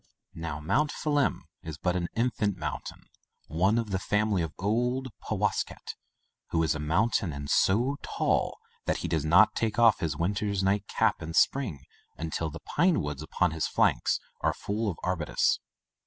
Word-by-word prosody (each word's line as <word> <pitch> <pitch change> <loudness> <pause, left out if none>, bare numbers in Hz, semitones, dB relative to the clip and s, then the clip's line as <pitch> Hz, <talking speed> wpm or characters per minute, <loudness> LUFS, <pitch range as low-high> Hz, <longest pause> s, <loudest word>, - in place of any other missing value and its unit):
Now 80 -3 -5
Mount 100 - +1
Phelim 145 -2 0 0.2
is 80 -2 -7
but 90 +2 0
an 85 -1 -1
infant 110 -5 0
moun - - -3
tain, - - -10 0.4
one 95 +8 +2
of 115 -3 -2
the 95 - 0
family 105 -1 +1
of 80 -2 -2
old 125 +6 0 0.2
Powasket - - -1 0.6
(who 80 -1 +1
is 80 - +2
a 75 - -4
mountain, 90 +4 +1
and 70 0 -6
so 120 - +2
tall - - 0 0.3
that - - +1
he - - 0
does 80 -3 0
not 95 +8 +6
take 110 -2 -1
off 115 -4 +5
his 75 -3 -2
winter 100 +5 0
nightcap 100 +1 +1
in 80 +1 -5
spring 115 - +2 0.4
until 80 0 -3
the 80 +2 -9
pine 170 +1 +2
woods 75 -1 -4
upon 85 +2 0
his 80 0 -1
flanks - - +2 0.2
are - - +1
full 105 +2 -2
of 85 - -4
arbutus). 90 -5 +1
95 Hz, 170 wpm, -28 LUFS, 80-110 Hz, 0.6 s, not